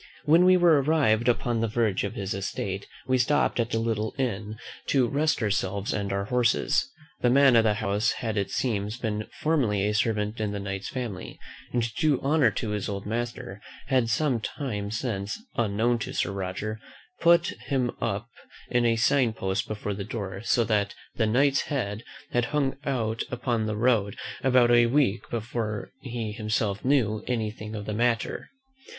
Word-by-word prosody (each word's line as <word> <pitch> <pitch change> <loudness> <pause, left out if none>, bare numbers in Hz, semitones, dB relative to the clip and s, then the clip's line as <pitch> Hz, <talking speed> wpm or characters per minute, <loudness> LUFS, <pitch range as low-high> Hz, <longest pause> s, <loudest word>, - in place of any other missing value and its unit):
When 165 +4 +6
we 185 0 +7
were 170 -5 +5
arrived 130 -6 +2
upon 120 -1 +1
the 115 - +1
verge 110 -3 0
of 100 +2 -3
his 100 -4 -3
estate, 95 0 -4 0.2
we 130 0 +2
stopped 125 +1 +2
at 115 0 0
a - - +2
little 110 -1 -1
inn 110 -4 -2 0.3
to 130 -3 +3
rest 145 -1 +1
ourselves 100 -1 -1
and 100 -1 -2
our 100 0 -1
horses. 125 - +2 0.3
The 120 - +3
man 135 0 +6
of 115 - +6
the 105 -1 +3
house 105 -1 +1
had 115 -4 -3
it 100 -2 -1
seems 105 -3 -1
been 110 -3 -3
formerly 120 -11 +2
a 105 - 0
servant 105 0 0
in 105 -1 -1
the 100 - -3
Knight's 100 0 -4
family; 120 -8 -5 0.3
and 120 -1 +1
to 115 -1 -3
do 155 -5 +2
honour 140 -3 +4
to 110 +1 -3
his 105 -1 -2
old 100 -1 -4
master, 120 -1 -4 0.3
had 125 -4 +2
some 130 0 +1
time 105 -4 -4
since, 105 -3 -3 0.2
unknown 115 +2 +1
to - - -5
Sir - - 0
Roger, 100 +3 -4 0.4
put 170 0 +5 0.2
him 130 -4 +1
up 115 -1 -2 0.4
in 120 -1 +3
a 115 - +3
sign 120 +1 +3
post 95 -2 -2
before 105 -1 -3
the 100 0 -4
door; 100 -2 -5
so 120 +1 +3
that 105 -3 0 0.2
THE 110 - +1
KNIGHT'S 135 +5 +3
HEAD 115 -7 -2 0.3
had 120 -1 +2
hung 135 +2 0
out 115 -5 -1
upon 120 -3 -1
the 105 -1 -2
road 110 -4 +2 0.3
about 125 -2 +5
a 120 0 +6
week 120 -4 +1
before 110 -2 -3
he 120 -4 -4
himself 110 -1 -1
knew 120 -6 +2
any 115 -4 -1
thing 110 0 -8
of 105 -1 -5
the 105 - -3
matter. 115 +1 0
115 Hz, 180 wpm, -27 LUFS, 105-125 Hz, 0.4 s, we